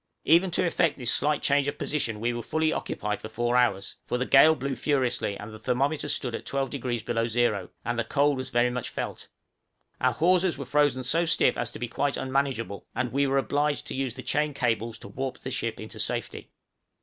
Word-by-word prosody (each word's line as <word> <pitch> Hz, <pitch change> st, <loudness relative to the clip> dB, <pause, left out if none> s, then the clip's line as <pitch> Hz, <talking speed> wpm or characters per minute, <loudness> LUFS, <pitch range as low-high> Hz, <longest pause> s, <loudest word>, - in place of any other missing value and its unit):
Even 170 Hz, +4 st, +5 dB
to 175 Hz, -, +1 dB
effect 170 Hz, -2 st, +1 dB
this 125 Hz, -3 st, +1 dB
slight 150 Hz, +1 st, +1 dB
change 140 Hz, 0 st, +3 dB
of 145 Hz, 0 st, -2 dB
position 120 Hz, -8 st, -2 dB
we 120 Hz, +2 st, 0 dB
were 120 Hz, -, -3 dB
fully 160 Hz, +5 st, 0 dB
occupied 105 Hz, -1 st, -3 dB
for 110 Hz, -, -7 dB
four 120 Hz, +2 st, -1 dB
hours; 100 Hz, -6 st, +1 dB
for 125 Hz, -, -2 dB
the 125 Hz, -, -1 dB
gale 155 Hz, +5 st, +7 dB
blew 140 Hz, -1 st, -3 dB
furiously, 125 Hz, -6 st, 0 dB
and 110 Hz, +1 st, -9 dB
thermometer 140 Hz, +5 st, 0 dB
stood 125 Hz, -4 st, 0 dB
at -, -, -4 dB
12° 130 Hz, -4 st, -2 dB
below 115 Hz, -1 st, 0 dB
zero, 115 Hz, -5 st, 0 dB, 0.2 s
and 120 Hz, -, -1 dB
the -, -, +2 dB
cold 145 Hz, +4 st, +2 dB
was 130 Hz, 0 st, -4 dB
very 120 Hz, +1 st, +2 dB
much 125 Hz, -1 st, -3 dB
felt; -, -, -5 dB, 0.7 s
our -, -, +2 dB
hawsers 180 Hz, 0 st, +2 dB
were 140 Hz, -, -5 dB
frozen 140 Hz, -1 st, +2 dB
so 165 Hz, +7 st, +2 dB
stiff 165 Hz, -, +3 dB
as -, -, -2 dB
to -, -, -9 dB
be 120 Hz, -, -3 dB
quite 140 Hz, +4 st, -1 dB
unmanageable, 130 Hz, -6 st, -2 dB
and 125 Hz, -1 st, -1 dB
we 140 Hz, +1 st, +2 dB
were 135 Hz, 0 st, +1 dB
obliged 145 Hz, +2 st, 0 dB
to -, -, -5 dB
use 130 Hz, -3 st, -2 dB
the 130 Hz, -, -8 dB
chain 150 Hz, -1 st, 0 dB
cables 115 Hz, -3 st, -1 dB
to -, -, -11 dB
warp 130 Hz, +6 st, -4 dB
the 130 Hz, -, -7 dB
ship 115 Hz, -3 st, -2 dB
into 110 Hz, -, -8 dB
safety. -, -, -3 dB
130 Hz, 210 wpm, -27 LUFS, 120-145 Hz, 0.7 s, gale